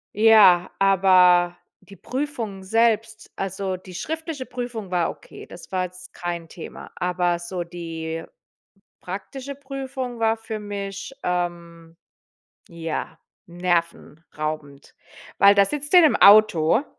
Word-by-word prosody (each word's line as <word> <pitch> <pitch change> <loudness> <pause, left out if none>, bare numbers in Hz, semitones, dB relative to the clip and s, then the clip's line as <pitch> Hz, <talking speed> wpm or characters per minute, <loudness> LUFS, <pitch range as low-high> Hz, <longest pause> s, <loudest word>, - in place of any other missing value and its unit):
Ja, 210 -5 +6
aber 185 -2 +5 0.3
die 200 - -15
Prüfungen 230 - -5
selbst 225 +1 0
also 190 -1 -3
die 185 0 -13
schriftliche 320 - -5
Prüfung 240 -6 -6
war 175 -2 +1
okay, - - -13
das 175 - -13
war 185 -1 0
jetzt 180 0 -12
kein 175 -1 -5
Thema. 170 - -10
Aber 180 -1 0
so 175 0 -4
die 165 -1 -6 0.8
praktische 255 +9 -7
Prüfung 265 -3 -6
war 225 0 +2
für 225 -1 -6
mich, 200 +3 -6
ähm 170 -2 -4 0.7
ja, 165 -2 -5 0.3
nervenraubend. 165 -4 -4 0.4
Weil 200 0 +7
da 200 -1 +5
sitzt 295 +7 -5
du 365 - +9
ja 330 - +8
in - - +3
'nem - - -2
Auto 210 - +6
190 Hz, 125 wpm, -23 LUFS, 175-225 Hz, 0.8 s, du